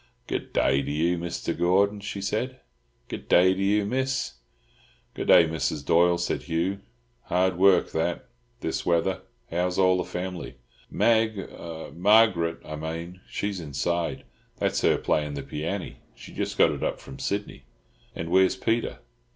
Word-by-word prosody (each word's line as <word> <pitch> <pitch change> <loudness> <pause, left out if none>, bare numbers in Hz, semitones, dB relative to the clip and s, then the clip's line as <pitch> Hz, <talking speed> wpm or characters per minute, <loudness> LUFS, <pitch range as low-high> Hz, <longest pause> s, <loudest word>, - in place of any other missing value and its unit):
"Good - - -4
daah 70 +1 +2
to 70 - -4
you, 85 +4 +1
Misther 85 0 -3
Gordon," 100 +4 +2
she 100 0 -5
said. 125 +6 -2 0.5
"Good - - -7
daah 90 +1 +6
to 95 - -4
you, 100 +1 +2
Miss." 130 - -1 0.8
"Good - - -5
day, 85 - +8
Mrs. 75 -2 -2
Doyle," 85 +1 +4
said 85 0 -2
Hugh. 90 +4 -1 0.5
"Hard 90 0 +1
work 95 -2 +5
that, 80 +2 -1 0.4
this - - -2
weather. 90 +2 +1 0.3
How's 90 +2 0
all 90 -1 +4
the 90 - 0
family?" 90 -6 -5 0.3
"Mag—Marg'rut, 100 -3 +2
I 75 - -6
mane—she's 85 +5 -5
inside. 80 +3 -2 0.3
That's - - 0
her - - +3
playin' 75 -1 0
the 70 - -5
pianny. 80 +7 -4 0.2
She - - -12
just - - -3
got - - +5
it - - -5
up - - -1
from 65 - -11
Sydney." 100 -10 -3 0.5
"And 85 +1 -5
where's 95 0 +4
Peter?" 115 +4 -1
90 Hz, 145 wpm, -26 LUFS, 80-100 Hz, 0.8 s, day